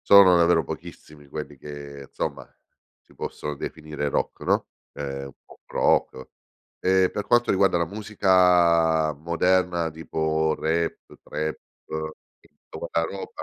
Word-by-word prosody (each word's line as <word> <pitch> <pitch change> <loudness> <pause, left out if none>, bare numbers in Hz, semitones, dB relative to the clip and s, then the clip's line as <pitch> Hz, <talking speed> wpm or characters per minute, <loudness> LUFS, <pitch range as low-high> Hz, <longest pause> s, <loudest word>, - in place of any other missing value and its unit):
sono 95 -3 +7
davvero 85 -2 +4
pochissimi 75 +1 -9
quelli 75 -1 -7
che, 70 -1 -9
insomma, - - -4 0.6
si - - -22
possono 75 0 -5
definire 75 -1 -4
rock, - - -2
no, - - +1 0.3
ehm, 70 -1 -5
un 70 - -10
pop - - -20
rock. 65 - +1 0.5
E 95 0 +3
per 105 - -4
quanto 120 0 +3
riguarda 95 -2 +3
la 85 - +2
musica 90 -5 +3
moderna 85 +2 +1
tipo 80 0 -1
rap, 80 +1 0 0.3
trap 80 0 -3 0.8
e - - -24 0.2
tutta - - -8
quella 85 0 0
roba, 100 0 -7
80 Hz, 130 wpm, -25 LUFS, 75-90 Hz, 0.8 s, sono